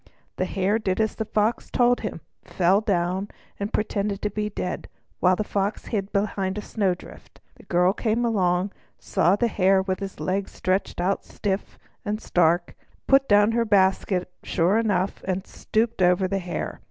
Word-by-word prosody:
The - - 0
Hare 195 +3 0
did 190 -3 -1
as 220 -1 +1
the 220 - -3
Fox 215 +2 0
told 245 0 +3
him, 210 -6 -5 0.2
fell 190 +3 +2
down, 190 -1 0 0.3
and 200 +1 -3
pretended 205 -2 -1
to 210 - 0
be 210 +1 -2
dead, 180 -3 -4 0.3
while 185 0 +4
the 215 - -1
Fox 200 0 -2
hid 200 -2 -1
behind 200 -1 -1
a - - -2
snow 195 -5 0
drift. - - -15
The - - -18
girl 180 +1 +3
came 230 +2 0
along, 190 -3 +1 0.3
saw 175 +4 +2
the 235 +3 +1
Hare 190 -3 +3
with 190 -1 -2
his 195 -1 -6
legs 195 +1 -2
stretched 185 0 -1
out 185 +3 0
stiff 195 -1 -3 0.3
and 210 -1 -2
stark, 175 -3 +2 0.3
put 270 0 +4
down 205 +1 +5
her 235 +1 +2
basket 190 -3 +2
sure 185 +5 +2
enough, 200 -4 0
and 190 +1 -2
stooped 225 -1 -1
over 180 +1 +4
the 195 +1 -1
Hare. 180 -1 -4
195 Hz, 175 wpm, -24 LUFS, 185-215 Hz, 0.3 s, down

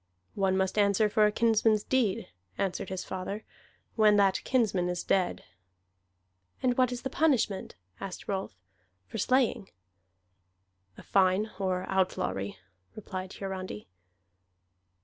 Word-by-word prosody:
"One 190 -2 +1
must 190 +2 0
answer 200 +1 +4
for 210 0 +4
a - - +1
kinsman's 220 -1 +3
deed," 245 -7 +1 0.3
answered 195 -2 -2
his 190 -1 -4
father, 190 +3 -5 0.5
"when 215 -2 +5
that 195 -2 +3
kinsman 200 -8 +1
is 180 0 -2
dead." 185 -2 +1 1.2
"And 250 -1 +3
what 255 -1 +3
is 245 -1 -5
the 265 - -2
punishment," 250 - +1 0.2
asked 195 -2 -7
Rolf, 195 - -3 0.5
"for 90 - -6
slaying?" 255 -6 +1 1.3
"A - - -11
fine 195 +2 +2
or 185 -1 -1
outlawry," 100 - -1 0.4
replied 190 -3 -6
Hiarandi. 185 - -6
195 Hz, 120 wpm, -29 LUFS, 185-220 Hz, 1.3 s, when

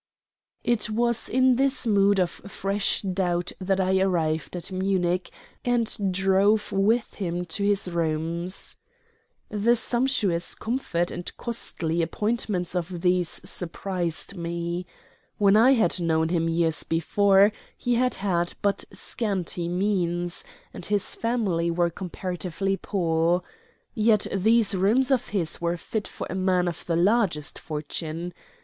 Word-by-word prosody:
It 240 -3 +1
was 235 +1 +1
in 255 0 +4
this 270 -1 +2
mood 200 -2 +4
of 180 -2 +2
fresh 200 +1 -1
doubt 180 -2 -1
that 190 +1 0
I 190 0 +2
arrived 165 -4 0
at 175 +2 -5
Munich, 185 -1 0 0.3
and 230 -5 0
drove 195 +3 +2
with 220 +4 +1
him 180 -2 -3
to 175 +4 -3
his 200 -2 +2
rooms. 170 +1 -2 0.7
The 215 +3 +2
sumptuous 225 -8 +1
comfort 220 -8 -2
and 175 - -5
costly 170 -8 -1
appointments 195 0 -1
of 175 0 -3
these 180 -2 +1
surprised 180 0 -2
me. 170 +1 -3 0.5
When 200 -1 +4
I 240 +5 +6
had 225 -6 +3
known 160 -1 +1
him 165 -1 +1
years 165 -1 +1
before, 195 +5 +3 0.3
he 245 - 0
had 250 +1 +2
had 175 -3 -1
but 200 -1 +1
scanty 185 -6 -2
means, 175 -2 -1 0.3
and - - -8
his 205 +1 0
family 205 -8 0
were 170 0 +1
comparatively 185 +1 -3
poor. 170 -3 0 0.5
Yet 215 -1 +3
these 220 +2 +3
rooms 220 +9 +2
of 255 -2 +2
his 175 -5 -2
were 170 0 0
fit 205 +3 -4
for - - -6
a - - -5
man 185 -1 +1
of 170 0 -5
the 170 - +1
largest 180 -4 +1
fortune. 160 +3 -5
185 Hz, 130 wpm, -25 LUFS, 170-210 Hz, 0.7 s, I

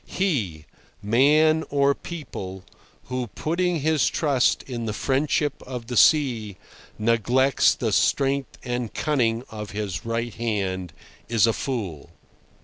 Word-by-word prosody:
He—man 140 - +1
or 140 0 +3
people—who, 125 - -8
putting 170 0 0
his 155 -2 +2
trust 140 -5 +1
in 120 -3 -5
the 105 - -2
friendship 145 +1 0
of 125 -3 -7
the 125 +1 -5
sea, 120 - +3 0.4
neglects 120 +4 +3
the - - -2
strength 140 -1 +1
and 125 -2 -3
cunning 120 -6 +1
of 105 -2 -6
his 100 -6 -3
right 115 0 -2
hand, 95 -6 -2 0.4
is 115 -2 +4
a 115 - +2
fool! 100 - -4
125 Hz, 115 wpm, -24 LUFS, 110-140 Hz, 0.4 s, is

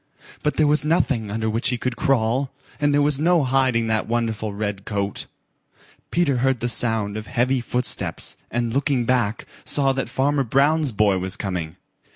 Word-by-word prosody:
But 150 - -1
there 155 - +3
was 150 +1 +4
nothing 145 - +1
under 110 +2 -2
which 115 +5 +1
he 125 - -1
could 125 0 -3
crawl, 130 +2 +1 0.3
and 145 0 +2
there 145 0 +3
was 145 -1 +2
no 170 0 +3
hiding 130 -3 +2
that 110 -1 -1
wonderful 115 -2 -1
red 100 -1 -4
coat. 100 -2 -3 0.8
Peter 160 -7 +1
heard 130 0 +1
the 120 - -1
sound 110 -3 0
of 110 0 -7
heavy 125 +1 +1
footsteps, 125 +1 -1
and 120 -1 -2
looking 135 -2 +1
back, 115 -3 0 0.2
saw 135 -2 +2
that 135 0 -3
Farmer 140 +1 +1
Brown's 140 +4 +2
boy 100 -3 +2
was 95 +2 -1
coming. 90 -5 -4
120 Hz, 175 wpm, -22 LUFS, 110-140 Hz, 0.8 s, was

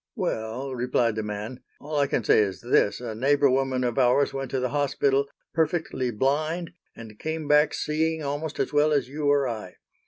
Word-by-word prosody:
"Well," 115 +5 -3
replied 120 -2 +1
the 110 - -2
man, 105 +4 -5 0.2
"all 150 0 -3
I 140 - +3
can 125 - -1
say - - +4
is 100 -3 0
this, 120 -3 +2
a 120 -3 -5
neighbor 140 +4 +3
woman 130 -1 0
of 120 +1 0
ours 130 +2 +3
went 135 -1 -4
to 135 - -1
that 125 - 0
hospital 140 0 +1 0.3
perfectly 160 -5 0
blind 155 +9 -1 0.2
and 110 -2 -11
came 160 -1 -4
back 150 +1 +4
seeing 160 +1 -1
almost 145 +2 -4
as - - -1
well 150 +1 +3
as 135 -4 0
you 145 +1 -1
or 140 -2 +3
I. 110 -6 -6
135 Hz, 190 wpm, -26 LUFS, 120-150 Hz, 0.3 s, say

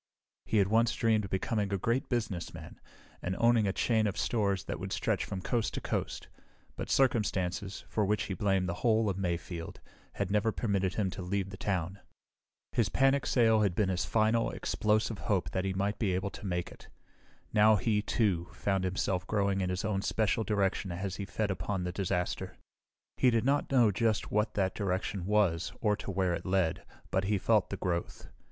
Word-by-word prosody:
He 110 - +1
had 100 -2 +4
once 115 +1 +3
dreamed 110 -2 +2
of - - -7
becoming 100 +1 -1
a 100 - +1
great 115 +7 -1
businessman 110 -9 -4 0.4
and 90 +1 -2
owning 115 -3 +4
a - - +2
chain 110 +1 +1
of 100 - -3
stores 100 -5 0
that - - -5
would - - -5
stretch - - 0
from 95 -1 -5
coast 115 -3 -1
to - - -2
coast, - - -3 0.5
but - - -5
circumstances, 100 -7 0
for 110 - 0
which 105 +2 +1
he 95 - -4
blamed 95 0 +1
the 85 - -1
whole 110 -3 +3
of 95 - -5
Mayfield, 85 -2 -4 0.3
had 95 - -2
never 105 +2 +2
permitted 100 -5 -1
him 100 -4 0
to - - -6
leave 95 +1 -2
the - - -6
town. 95 -1 -2 0.7
His - - +1
panic 135 +1 +2
sale 115 -3 +4
had 100 -4 +1
been 100 -1 +2
his 90 -1 0
final, 110 +1 +2
explosive 110 0 0
hope 100 -4 0
that 95 0 -1
he 95 - -1
might 100 +2 -1
be 95 -5 +1
able 95 +2 -2
to 100 - -7
make 90 -1 -2
it. - - -14 0.7
Now, 110 +1 +6
he, 105 +1 +1
too, 95 -6 0
found 95 -2 -1
himself 90 0 -1
growing 100 -2 +1
in 90 - -1
his 90 +1 -2
own 100 -3 0
special 110 +2 +1
direction 100 -3 0
as 95 +2 -4
he 100 - -4
fed 105 0 -2
upon 95 0 -2
the 90 - -2
disaster. 90 -1 -2 0.6
He 130 - +5
did 115 -1 +1
not 140 +1 +1
know 120 -5 +5
just 110 +1 0
what 105 +1 +1
that 95 -2 +1
direction 95 -1 -2
was 90 -5 +2
or 105 -2 +2
to - - -7
where 95 -2 +1
it - - -3
led, 90 -3 0 0.2
but 95 +1 +1
he 105 +1 +1
felt 105 +1 +2
the - - -4
growth. 85 -2 -3
100 Hz, 195 wpm, -31 LUFS, 95-110 Hz, 0.7 s, Now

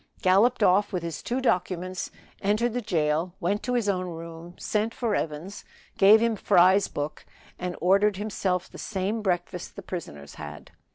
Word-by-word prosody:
Galloped 210 +6 +4
off 200 +2 +4
with 180 -4 -2
his 165 -3 -4
two 245 +2 -2
documents 185 -6 -1 0.3
entered 215 +4 +1
the 245 - -1
jail 165 -2 0
went 200 +3 0
to 250 - -1
his 235 -4 +1
own 185 -2 0
room 165 0 -8
sent 220 +2 -1
for 230 -4 -1
Evans 165 +4 -3 0.3
gave 205 +3 +7
him 230 0 +1
Fry's 190 0 +4
book, 145 +1 -5 0.4
and 180 -1 -3
ordered 195 +2 +3
himself 190 -3 -1
the - - -12
same 205 +2 -2
breakfast 180 -2 -2
the 200 - -8
prisoners 75 - -7
had. - - -9
190 Hz, 165 wpm, -26 LUFS, 175-210 Hz, 0.4 s, gave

